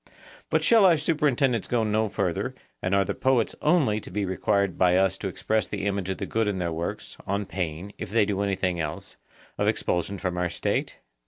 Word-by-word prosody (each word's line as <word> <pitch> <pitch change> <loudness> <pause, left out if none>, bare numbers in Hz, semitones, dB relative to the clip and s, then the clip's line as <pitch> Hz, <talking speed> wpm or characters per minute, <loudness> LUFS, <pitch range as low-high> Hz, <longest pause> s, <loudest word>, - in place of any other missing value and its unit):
But - - +2
shall 225 -4 +6
our 170 -3 +5
superintendence 140 -6 +1
go 120 -2 +1
no 110 +1 +1
further, 95 -4 -2 0.3
and 95 +1 +1
are 100 0 +3
the - - -2
poets 130 -4 +1
only 150 -10 +3
to - - -10
be 105 -1 -2
required 100 0 0
by 90 -1 +4
us 95 0 +3
to 100 - -3
express 110 +3 -1
the 100 -1 -4
image 100 -2 -1
of 95 - -2
the - - -3
good 115 -1 0
in 100 -2 -1
their 85 -2 -2
works, 85 +2 -5
on 100 +1 -1
pain, 90 +1 -4
if 110 - -5
they 110 0 +3
do 100 -1 -1
anything 95 -3 0
else, 75 -1 -5 0.4
of - - +2
expulsion 90 +3 0
from 90 -1 -2
our 90 -1 0
State? - - -2
100 Hz, 210 wpm, -26 LUFS, 90-110 Hz, 0.4 s, shall